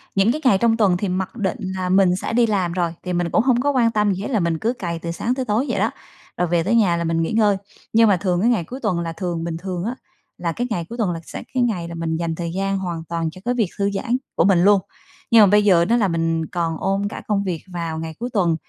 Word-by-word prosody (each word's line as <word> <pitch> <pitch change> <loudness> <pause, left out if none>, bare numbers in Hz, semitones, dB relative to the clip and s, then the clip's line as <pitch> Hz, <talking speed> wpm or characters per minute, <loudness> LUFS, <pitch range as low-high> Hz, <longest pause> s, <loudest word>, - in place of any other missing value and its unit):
những 195 +4 +4
cái 305 - -3
ngày 200 -7 +5
trong 225 +1 +2
tuần 195 -5 +3
thì 195 +1 -2
mặc 190 +3 -3
định 190 -5 -1 0.2
là 185 -1 -2
mình 185 -1 +4
sẽ 190 - -4
đi 235 0 +4
làm 190 -5 0
rồi, 170 -2 -1
thì 180 - -3
mình 175 -1 0
cũng 220 - +3
hông 245 -2 +3
có 285 +2 +2
quan 240 -4 +2
tâm 210 -2 +2
gì 190 - -5
hết, - - -3
là 220 - +2
mình 170 -2 0
cứ 235 +3 0
cày 170 -8 -4
từ 170 - -4
sáng 230 +8 -1
tới 260 -1 -2
tối 225 +6 +1
vậy - - 0
đó, - - +1 0.5
rồi 180 - +1
về 170 0 +1
tới 215 +7 +1
nhà 190 -7 +3
là 170 - -1
mình 165 0 0
nghỉ 165 - -1
ngơi. 210 -3 +3 0.4
Nhưng 225 -1 +6
mà 190 - +4
thường 180 -1 0
cái 230 - +3
ngày 225 -8 +1
cuối 255 +11 -8
tuần 185 -6 +1
là 165 -1 -3
thường 170 -1 -3
bình 165 -1 -3
thường 180 0 -4
á, 240 +3 -2 0.4
là 170 -1 -2
cái 245 +8 -3
ngày 170 -5 -1
cuối 235 - -7
tuần 210 -7 0
là 165 - -4
sẽ - - -8
cái 255 - +2
ngày 185 -8 -1
là 170 - -7
mình 165 -1 -2
dành 165 -1 -2
thời 170 0 -4
gian 195 +1 -1
hoàn 175 -3 -4
toàn 165 -1 -1
cho 185 - -13
cái 245 - +1
việc 225 -7 0
thư 200 0 +1
giãn 235 +5 -1 0.2
của - - +3
mình 185 -3 +4
luôn. 200 -1 +5 0.5
Nhưng 230 - +8
mà - - +7
bây 210 +2 +4
giờ 170 -4 +5
đó 230 +6 +2
là 215 -4 +2
mình 165 -1 0
còn 165 -2 -2
ôm 195 +1 0
cả - - -7
công 200 -2 +1
việc 175 -5 -3
vào 165 -2 -3
ngày 160 0 -5
cuối 240 +2 -3
tuần, 175 -6 +2
190 Hz, 300 wpm, -21 LUFS, 170-220 Hz, 0.5 s, Nhưng